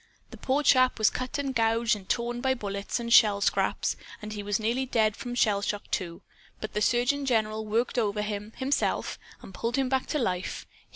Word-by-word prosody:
The - - -10
poor 275 +3 0
chap 255 -2 +4
was 215 -1 +4
cut 255 +2 -4
and 275 -2 -2
gouged 230 -1 +2
and 195 -2 -12
torn 240 0 -1
by 260 0 +1
bullets 200 -1 -3
and 235 0 -1
shell 210 -4 +6
scraps, - - +1 0.2
and 215 0 -7
he 210 - -5
was 205 0 -1
nearly 235 +4 0
dead 220 -4 +2
from 245 0 -6
shell 210 -4 +2
shock, 205 0 -4
too. 170 -3 -3 0.4
But 215 - -6
the 210 - -1
surgeon 245 +5 +2
general 220 -4 0
worked 235 +3 0
over 210 -2 0
him, 210 0 -4
himself, 275 +2 -1 0.2
and 190 - -11
pulled 230 +5 -2
him 270 -2 +1
back 265 0 0
to 300 - -1
life. 185 -8 -2
225 Hz, 205 wpm, -27 LUFS, 210-250 Hz, 0.4 s, shell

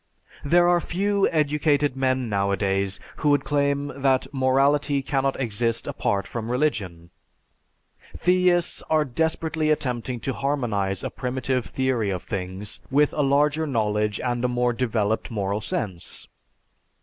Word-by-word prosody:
There 175 +4 +4
are 175 -1 +4
few 200 +3 +1
educated 150 -2 +1
men 130 -1 0
nowadays 100 -1 0 0.2
who 150 - +1
would 145 -1 +3
claim 140 0 0
that 135 -1 +2
morality 140 +2 +2
cannot 135 -1 0
exist 115 -1 0
apart 100 -1 -1
from 115 -1 -5
religion. 100 - -2 1.1
Theists 180 -1 +2
are 155 -1 +3
desperately 160 +3 -1
attempting 125 -4 -1
to 135 - -2
harmonize 110 -10 -1
a - - -3
primitive 130 -1 -2
theory 130 -5 0
of 90 -2 -3
things, 95 0 -5
with 145 +2 +3
a 150 - 0
larger 145 +3 +2
knowledge 105 -4 0
and 120 -1 -2
a - - +3
more 125 0 +1
developed 110 -3 -1
moral 100 -1 -2
sense. 95 -5 -5
130 Hz, 130 wpm, -24 LUFS, 110-145 Hz, 1.1 s, There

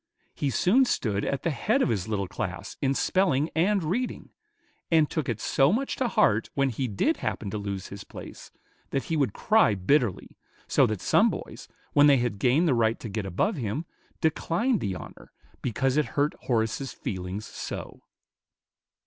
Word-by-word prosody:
He 145 - -1
soon 220 - +4
stood 105 - -1
at 140 - -2
the 170 - +1
head 220 - +1
of - - +1
his 105 -4 -1
little 100 -3 -1
class - - -5
in 135 0 +1
spelling 165 -5 +1
and 190 +3 +2
reading, 220 +11 -3 0.6
"and 160 -2 +4
took 155 -4 -3
it 115 -2 -2
so 135 +6 +3
much 265 +7 -1
to 255 - +1
heart 115 - +2
when 140 -1 +2
he 130 +2 -2
did 100 -4 0
happen 100 - -3
to 105 - -3
lose 100 -2 -5
his 100 0 -8
place, - - -10 0.4
that 135 - -1
he 165 - -2
would 140 -8 +1
cry 215 - +3
bitterly; 115 +2 0 0.3
so - - +4
that 105 -3 -3
some - - +4
boys, - - -7 0.3
when 145 0 +6
they 140 -2 +6
had 120 -5 -1
gained 135 - +3
the 145 - +4
right 115 -1 +2
to 115 - -6
get 100 -1 -3
above 180 - 0
him, 125 +6 -3 0.4
declined 180 - +1
the 100 -4 -2
honor, - - -11 0.3
because 130 +3 0
it 150 - +3
hurt 145 +1 +2
Horace's 115 +2 0
feelings 95 +2 -5
so." - - -7
135 Hz, 180 wpm, -27 LUFS, 105-165 Hz, 0.6 s, when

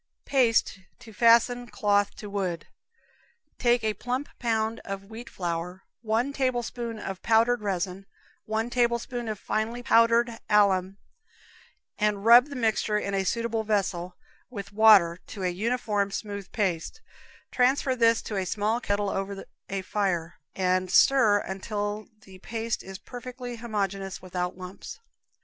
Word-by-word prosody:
Paste 235 -6 +2 0.2
to 225 - -14
Fasten 235 +2 +4
Cloth 205 -4 +1
to 210 - -8
Wood. 190 -4 -3 0.9
Take 240 -1 +3
a 215 -1 +1
plump 255 +6 -3
pound 225 -1 0
of 195 0 -5
wheat 230 +2 -8
flour, 175 +1 -4 0.2
one 235 +5 0
tablespoonful 240 -4 -2
of 190 -1 -5
powdered 230 +1 +3
resin, 195 -1 -3 0.4
one 220 +2 -2
tablespoonful 240 -1 0
of - - -13
finely 225 +5 -2
powdered 230 0 +3
alum, 195 -2 +3 1.0
and 210 -1 0
rub 240 +3 +8
the 285 - -8
mixture 220 -3 +1
in 200 -1 -3
a 195 -1 +1
suitable 230 +2 -1
vessel, 185 -4 -1 0.3
with 200 -5 -8
water, 200 -6 +6
to 200 -3 -7
a 180 - +1
uniform, 210 +1 -1
smooth 200 -1 -6
paste; 190 - -2 0.5
transfer 260 +1 +2
this 230 -2 +3
to 210 - -4
a 190 - -1
small 215 +4 0
kettle 205 -2 -1
over 195 0 -4 0.2
a 195 -1 -3
fire, 180 -5 -2 0.2
and 185 0 +1
stir 220 0 +5
until 205 +2 -4
the 190 -3 -15
paste 225 +2 -3
is 190 0 -9
perfectly 245 +2 -8
homogeneous 200 -4 -3
without 180 -1 -4
lumps. 185 - -9
215 Hz, 135 wpm, -27 LUFS, 195-235 Hz, 1.0 s, rub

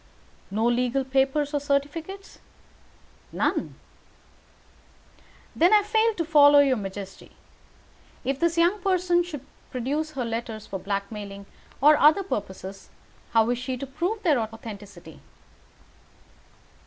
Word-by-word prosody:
"No 215 +3 -1
legal 250 +2 +1
papers 270 +2 +1
or 290 - +1
certificates?" 300 +7 -3 0.9
"None." - - -1 1.8
"Then 350 +5 +4
I 415 - +4
fail 440 +1 +2
to 335 - -2
follow 290 -2 +6
your 280 -2 +5
majesty. 195 -2 -8 0.9
If 270 0 -1
this 335 +1 +1
young 350 +4 +3
person 360 -2 +2
should 300 -6 -7 0.2
produce 290 +5 -3
her 255 -4 -3
letters 230 -2 -5
for 195 - -6
blackmailing 200 0 -5 0.4
or 300 +2 +7
other 310 +7 +5
purposes, 195 - -6 0.4
how 225 -1 +4
is 245 - -1
she 255 0 -4
to 275 - -5
prove 350 +11 -3
their 305 -8 +3
authenticity?" 220 -2 -8
275 Hz, 115 wpm, -25 LUFS, 225-335 Hz, 1.8 s, or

